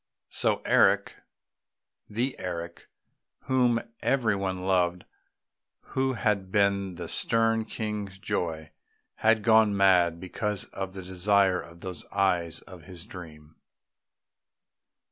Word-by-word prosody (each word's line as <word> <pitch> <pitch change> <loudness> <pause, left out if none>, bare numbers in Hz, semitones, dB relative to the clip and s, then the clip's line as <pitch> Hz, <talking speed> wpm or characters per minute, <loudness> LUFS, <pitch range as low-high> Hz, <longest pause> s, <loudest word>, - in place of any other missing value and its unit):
So - - 0
Eric - - +3 0.9
the 120 +6 -1
Eric 85 -1 -6 0.5
whom 125 -3 +2 0.2
every 120 -6 +2
one 95 -2 -3
loved, 90 -2 +1 0.9
who 130 0 +1
had 100 -4 -1
been 100 -2 +1
the 85 - -6
stern 115 -1 +2
King's 105 -3 -5
joy 80 -5 -3 0.5
had 110 -1 +3
gone 110 -2 +5
mad 90 -4 +4
because 100 +2 -3
of 95 -1 -5
the 95 - -6
desire 95 +1 +2
for 85 - -14
those 90 0 -8
eyes 85 -4 0
of 90 -4 -13
his 90 -1 -8
dream. 80 -7 -11
95 Hz, 110 wpm, -27 LUFS, 90-105 Hz, 0.9 s, gone